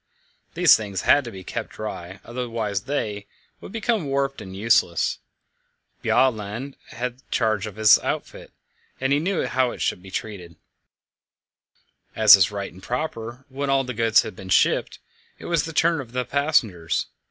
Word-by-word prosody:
These -, -, +7 dB
things 100 Hz, -4 st, -4 dB
had 145 Hz, -, +5 dB
to 120 Hz, -, -6 dB
be 95 Hz, -2 st, -10 dB
kept -, -, -5 dB
dry, 95 Hz, -3 st, -7 dB
otherwise 115 Hz, -5 st, -3 dB
they, 105 Hz, -8 st, -3 dB, 0.3 s
would -, -, -11 dB
become 225 Hz, -4 st, -1 dB
warped 135 Hz, 0 st, -1 dB
and 95 Hz, -1 st, -9 dB
useless. 100 Hz, -5 st, +2 dB, 0.8 s
Bjaaland 120 Hz, +1 st, 0 dB
had 125 Hz, +1 st, -5 dB
charge 110 Hz, -1 st, 0 dB
of 105 Hz, -, -9 dB
this 110 Hz, -1 st, +6 dB
outfit, -, -, -5 dB, 0.5 s
and 135 Hz, +1 st, +1 dB
he 145 Hz, -, +3 dB
knew 185 Hz, +4 st, -1 dB
how 130 Hz, -1 st, +1 dB
it -, -, -8 dB
should -, -, -1 dB
be 95 Hz, -, -12 dB
treated. 95 Hz, -4 st, -6 dB, 1.6 s
As 110 Hz, -2 st, +9 dB
is 95 Hz, -4 st, +3 dB
right 100 Hz, -1 st, -5 dB
and 95 Hz, -, -14 dB
proper, 125 Hz, 0 st, -5 dB
when 140 Hz, 0 st, -4 dB
all 135 Hz, 0 st, +3 dB
the 125 Hz, -1 st, -5 dB
goods 115 Hz, -1 st, +3 dB
had -, -, -8 dB
been 95 Hz, 0 st, -10 dB
shipped, -, -, +2 dB, 0.4 s
it -, -, -12 dB
was 170 Hz, -3 st, +1 dB
the 165 Hz, -, -6 dB
turn 165 Hz, 0 st, +2 dB
of 120 Hz, -2 st, -12 dB
the 125 Hz, 0 st, -1 dB
passengers. 125 Hz, -, 0 dB
115 Hz, 165 wpm, -23 LUFS, 100-135 Hz, 1.6 s, As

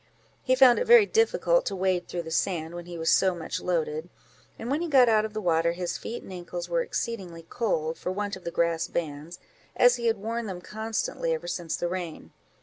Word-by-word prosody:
He 255 Hz, -, +2 dB
found 255 Hz, -2 st, +7 dB
it -, -, -2 dB
very 470 Hz, -3 st, +8 dB
difficult 480 Hz, +3 st, +2 dB
to -, -, -2 dB
wade 185 Hz, -1 st, 0 dB
through 175 Hz, -1 st, -4 dB
the 160 Hz, -, -8 dB
sand, 165 Hz, -1 st, -1 dB
when 175 Hz, 0 st, -8 dB
he 175 Hz, -1 st, -7 dB
was 165 Hz, 0 st, +1 dB
so 190 Hz, -2 st, +3 dB
much 165 Hz, -2 st, -5 dB
loaded; 160 Hz, -1 st, -2 dB, 0.5 s
and 235 Hz, +3 st, -5 dB
when 295 Hz, +4 st, 0 dB
he 345 Hz, -, -1 dB
got 265 Hz, -5 st, +6 dB
out 215 Hz, -1 st, +4 dB
of 215 Hz, -, -7 dB
the 215 Hz, -, -3 dB
water, 170 Hz, -2 st, +2 dB
his 175 Hz, 0 st, -3 dB
feet 235 Hz, -, -6 dB
and 190 Hz, -, -10 dB
ancles 175 Hz, -1 st, -6 dB
were 170 Hz, -1 st, +1 dB
exceedingly 180 Hz, -8 st, -4 dB
cold, 165 Hz, -9 st, -1 dB
for 180 Hz, -, -3 dB
want 205 Hz, +1 st, -3 dB
of 185 Hz, -, -12 dB
the -, -, -3 dB
grass 170 Hz, -1 st, 0 dB
bands, 155 Hz, +1 st, -4 dB, 0.4 s
as 245 Hz, 0 st, +5 dB
he 235 Hz, -1 st, -1 dB
had 225 Hz, -1 st, +2 dB
worn 225 Hz, +3 st, -3 dB
them 185 Hz, -3 st, -5 dB
constantly 225 Hz, -, -2 dB
ever 480 Hz, +1 st, -7 dB
since 170 Hz, -, -3 dB
the 175 Hz, -, -1 dB
rain. 175 Hz, -3 st, -5 dB
185 Hz, 225 wpm, -27 LUFS, 170-235 Hz, 0.5 s, very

